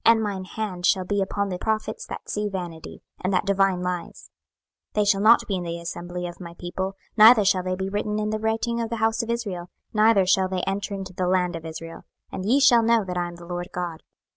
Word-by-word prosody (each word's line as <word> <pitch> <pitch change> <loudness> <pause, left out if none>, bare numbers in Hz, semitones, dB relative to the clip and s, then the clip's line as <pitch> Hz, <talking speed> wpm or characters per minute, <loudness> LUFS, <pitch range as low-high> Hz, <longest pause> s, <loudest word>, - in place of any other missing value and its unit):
26:013:009 - - +7
And 225 -1 -1
mine 200 -3 -3
hand 185 -2 -4
shall 185 -2 +2
be 200 +1 0
upon 200 +1 -1
the 180 -1 -4
prophets 220 +1 -2
that - - -8
see 210 0 -2
vanity, 175 -4 -7 0.2
and 185 - 0
that 185 +1 +1
divine 195 -2 +2
lies: 180 -1 -5 0.6
they 210 -1 +2
shall 200 -1 +3
not 225 +3 +6
be 195 - -1
in 180 - -4
the 170 0 -4
assembly 175 +1 -5
of 175 -1 -7
my 170 -2 -9
people, 190 +2 -4 0.2
neither 220 0 +8
shall 190 -1 +3
they 185 0 -2
be 190 +1 -3
written 210 +1 -2
in 215 0 -1
the 215 - -1
writing 225 +2 -1
of 230 - -3
the 230 - -2
house 225 +1 +1
of 230 - -6
Israel, 200 -7 -3 0.2
neither 215 -2 +5
shall 185 0 +3
they 185 -1 -2
enter 200 +1 -2
into 190 -1 -7
the 180 0 -1
land 180 -1 +1
of 165 0 -6
Israel; 165 +1 -8 0.3
and 185 - -4
ye 260 +5 +4
shall 255 -4 +6
know 230 -1 +3
that 180 -1 -4
I 175 -1 -1
am 175 - -9
the 170 0 -12
Lord 175 0 -4
GOD. 175 -3 -4
190 Hz, 240 wpm, -24 LUFS, 180-215 Hz, 0.6 s, neither